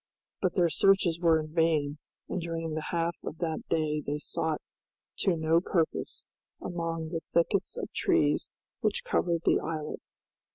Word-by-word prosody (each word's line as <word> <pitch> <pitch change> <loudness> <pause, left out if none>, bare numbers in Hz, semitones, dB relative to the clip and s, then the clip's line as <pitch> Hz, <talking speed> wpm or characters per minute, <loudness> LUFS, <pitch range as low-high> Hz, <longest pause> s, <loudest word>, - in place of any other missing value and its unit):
But 185 -3 +1
their 175 -3 +3
searches 185 -1 +4
were 165 -2 +4
vain, 155 -2 +1 0.3
and 185 - -2
during 165 -1 -3
the 155 0 -3
half 170 0 0
of 160 - -5
that 160 -2 -2
day 155 -2 +1
they 145 +1 -2
sought 155 +1 -2 0.6
to 190 -3 +2
no 160 +1 +3
purpose 170 -3 -1 0.3
among 165 -2 -3
the 165 0 -2
thickets 185 - 0
of - - -3
trees - - +2 0.3
which - - 0
covered 170 - +1
the - - +5
islet. 155 -1 -4
165 Hz, 150 wpm, -29 LUFS, 155-170 Hz, 0.6 s, the